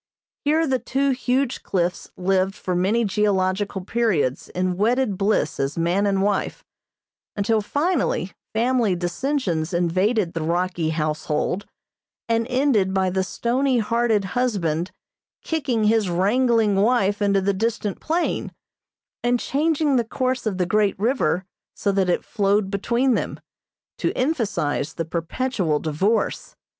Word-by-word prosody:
Here 315 +3 +3
the 265 -3 +1
two 270 +4 0
huge 260 0 0
cliffs 180 -2 -2
lived 190 +1 +1
for 185 - -3
many 200 +6 +2
geological 195 -1 0
periods 180 - 0
in 180 0 -1
wedded 225 +2 +1
bliss 195 -5 0
as 135 +3 -1
man 175 +5 +1
and 195 -1 +1
wife, 205 -1 -1 0.7
until 215 +2 +1
finally 285 - 0 0.2
family 230 -3 +2
dissensions 175 - -1
invaded 185 +3 +1
the 165 - -3
rocky 175 0 0
household, 155 +4 -1 0.6
and 230 0 +1
ended 250 -8 +2
by 190 -1 +2
the 190 +1 0
stony 250 +6 0
hearted 230 -2 +1
husband 185 -10 0 0.5
kicking 270 -9 -1
his 215 -2 +3
wrangling 215 +3 +2
wife 205 -1 +2
into 200 -1 +3
the 195 +1 +1
distant 215 0 -2
plain, 335 +2 -1 0.7
and 245 0 +2
changing 295 0 +1
the 240 - +2
course 255 +1 -2
of 195 -4 -1
the 180 - +1
great 205 +1 +1
river 195 - +1 0.3
so 200 - 0
that 190 -2 +1
it 175 - 0
flowed 200 -1 +1
between 240 +6 +1
them, - - -2 0.6
to - - +1
emphasize 205 - -1
the 165 - -2
perpetual 170 - -1
divorce. 185 +9 -1
205 Hz, 130 wpm, -23 LUFS, 185-240 Hz, 0.7 s, Here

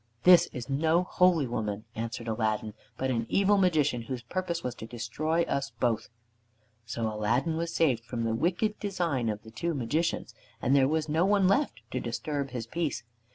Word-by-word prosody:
"This 180 -1 +8
is 125 -2 -6
no 160 +5 +2
holy 180 -4 +3
woman," 110 -3 -3
answered 115 0 -5
Aladdin, 110 -1 -1 0.2
"but 130 0 0
an 115 -2 -1
evil 200 +1 +4
Magician 150 -9 +2
whose 120 +1 -5
purpose 170 +5 -3
was 125 - -2
to 110 - -6
destroy 145 +9 -1
us 140 -4 -2
both." 120 -3 0 0.8
So 115 0 -2
Aladdin 110 +9 0
was 165 +1 -2
saved 130 -8 +2
from 120 -1 -3
the 115 0 0
wicked 175 - 0
design 170 - -1
of 105 -1 -4
the 110 - -12
two 165 +9 -2
Magicians, 145 +6 -1 0.3
and 135 - +2
there 135 -1 +5
was 155 +1 0
no 160 +3 +2
one 195 -1 +4
left 200 - +1
to 130 - -1
disturb 135 +4 -3
his 120 -3 -4
peace. 155 +3 -2
135 Hz, 180 wpm, -29 LUFS, 115-170 Hz, 0.8 s, This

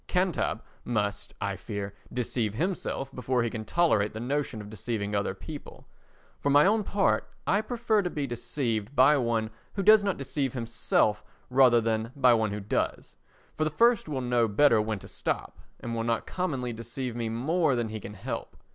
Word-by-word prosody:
"Cantab" 180 -2 0 0.2
must, 105 -4 -2
I 100 -1 -2
fear, 100 0 -5 0.2
deceive 115 -3 -1
himself 145 - -2
before 125 -1 0
he 115 - -1
can 110 - -4
tolerate 110 -8 +2
the 110 - -5
notion 135 -1 -2
of 105 - -8
deceiving 105 0 -3
other 100 -1 0
people. 145 +9 -10 0.5
For 145 - 0
my 145 +1 +6
own 210 +2 +3
part 110 - +1 0.2
I 200 +3 +3
prefer 225 -2 +1
to 180 - -2
be 150 -4 -2
deceived 120 -1 -3
by 135 +3 +6
one 115 -3 0 0.2
who 195 - -2
does 215 +1 +7
not 200 -3 0
deceive 135 -1 -2
himself 115 -3 +1 0.3
rather 125 -2 +6
than 110 0 -1
by 130 -3 +5
one 110 -2 +2
who 105 - -3
does, 100 - -2 0.4
for 155 - -1
the 155 - +1
first 230 +3 +3
will 135 -3 -2
know 120 -2 +2
better 115 +1 +4
when 110 0 -2
to - - -11
stop, - - -3 0.2
and 120 - -4
will 115 - -1
not 115 -1 0
commonly 135 -10 -2
deceive 115 +2 -5
me 115 -2 -2
more 145 +6 +1
than 120 -2 -1
he 110 0 -5
can 105 +1 -9
help. 95 - -6
120 Hz, 185 wpm, -28 LUFS, 110-150 Hz, 0.5 s, does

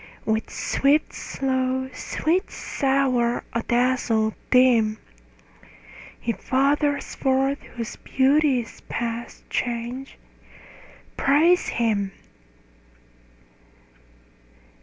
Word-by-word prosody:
With 220 0 0
swift, 290 +3 +1
slow; 260 -1 -1
sweet, 340 +8 -1
sour; 265 -3 0
adazzle, 235 -2 +1 0.2
dim; 235 -4 +4 1.2
He 235 - -1
fathers 285 +4 0
forth 270 +1 +1
whose 230 -2 -5
beauty 270 -1 +2
is 230 - -13
past 235 0 -4
change: 245 +2 -3 1.0
Praise 320 +6 +4
him. 205 -4 0
255 Hz, 70 wpm, -24 LUFS, 235-275 Hz, 1.2 s, dim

